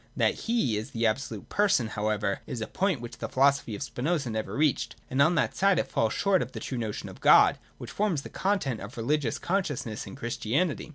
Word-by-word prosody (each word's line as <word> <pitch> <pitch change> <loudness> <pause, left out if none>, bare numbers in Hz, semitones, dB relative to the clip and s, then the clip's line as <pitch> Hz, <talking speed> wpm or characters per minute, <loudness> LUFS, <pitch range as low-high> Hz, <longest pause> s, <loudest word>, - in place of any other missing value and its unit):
That - - +3 0.2
He 180 - +2
is 110 - -4
the 115 0 -1
absolute 110 -1 -2
Person 195 - +2
however 105 -2 -1
is 120 - -4
a 110 - -2
point 185 - -1
which 120 0 -8
the 115 - -4
philosophy 135 -4 +2
of 105 - -4
Spinoza 140 0 -2
never 110 0 -3
reached: 150 -1 +1 0.2
and 130 +2 +2
on 160 +5 +4
that - - +1
side 195 -1 +3
it - - -1
falls 110 -1 +1
short 195 -2 +2
of 125 - -5
the - - -5
true 130 - -4
notion 110 -3 -4
of - - -11
God - - +6 0.2
which 120 - -8
forms 180 -5 0
the - - -8
content 185 - -1
of 100 +5 -9
religious 125 +1 0
consciousness 145 - -2
in 95 - -8
Chris 120 0 -4
tianity. 145 +9 -1
130 Hz, 220 wpm, -28 LUFS, 110-165 Hz, 0.2 s, God